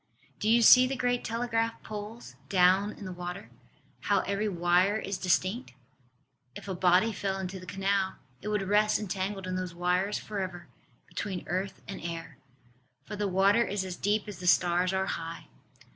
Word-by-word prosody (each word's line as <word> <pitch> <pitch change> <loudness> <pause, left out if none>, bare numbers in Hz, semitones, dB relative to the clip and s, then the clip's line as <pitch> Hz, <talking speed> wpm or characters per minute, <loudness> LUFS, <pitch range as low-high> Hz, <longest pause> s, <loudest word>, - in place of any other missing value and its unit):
Do 215 - 0
you 235 +1 +5
see 255 +2 +9
the 270 - -2
great 245 -1 0
telegraph 230 0 -1
poles 215 +2 -8
down 190 +2 +4
in 200 - -10
the 185 - -5
water, 180 +2 -7 0.5
how - - +2
every 200 +2 -1
wire 180 +3 +2
is 195 -3 -4
distinct? 185 - 0 0.8
If - - -9
a 190 - -2
body 185 +5 +3
fell 195 -2 -2
into 190 0 -5
the 185 - -12
canal 195 0 0 0.3
it - - -7
would 210 -2 0
rest 210 +1 +3
entangled 195 -1 -3
in 185 0 -2
those 180 -2 -4
wires 180 +3 +1
for 210 -2 -5
ever, 175 -2 -5 0.4
between 190 -4 -5
earth 190 +2 -3
and 195 -2 -7
air. 165 -4 -6 0.7
For 210 - -6
the 205 0 -1
water 195 +4 +4
is 200 -3 -2
as 185 -1 -5
deep 205 +2 0
as 200 -4 -8
the 180 - -5
stars 180 +1 +3
are 190 0 0
high. 165 -2 -5
195 Hz, 175 wpm, -29 LUFS, 180-210 Hz, 0.8 s, see